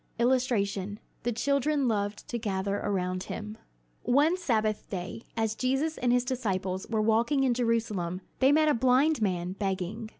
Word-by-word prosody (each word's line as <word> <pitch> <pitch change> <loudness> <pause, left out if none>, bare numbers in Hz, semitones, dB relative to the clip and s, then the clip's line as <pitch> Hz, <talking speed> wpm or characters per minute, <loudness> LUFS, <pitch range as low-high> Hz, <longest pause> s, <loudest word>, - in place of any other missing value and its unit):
[Illustration: 215 -5 +1 0.2
The 240 - -1
children 280 +3 +1
loved 205 -2 -2
to 240 - -2
gather 200 -2 -1
around 185 -3 -2
him] 215 0 -6 0.4
One 290 +7 +3
Sabbath 220 - -1
day, 185 +3 -5 0.2
as 220 -1 +1
Jesus 270 +7 0
and 245 -1 +2
his 245 0 +2
disciples 190 -7 -2
were 220 -2 +1
walking 235 +6 +2
in 255 -2 +3
Jerusalem, 220 -7 -1 0.2
they 265 +1 +5
met 310 +1 +4
a 300 - +4
blind 260 +4 +3
man 180 -3 0
begging. 195 +3 -3
225 Hz, 155 wpm, -28 LUFS, 200-255 Hz, 0.4 s, they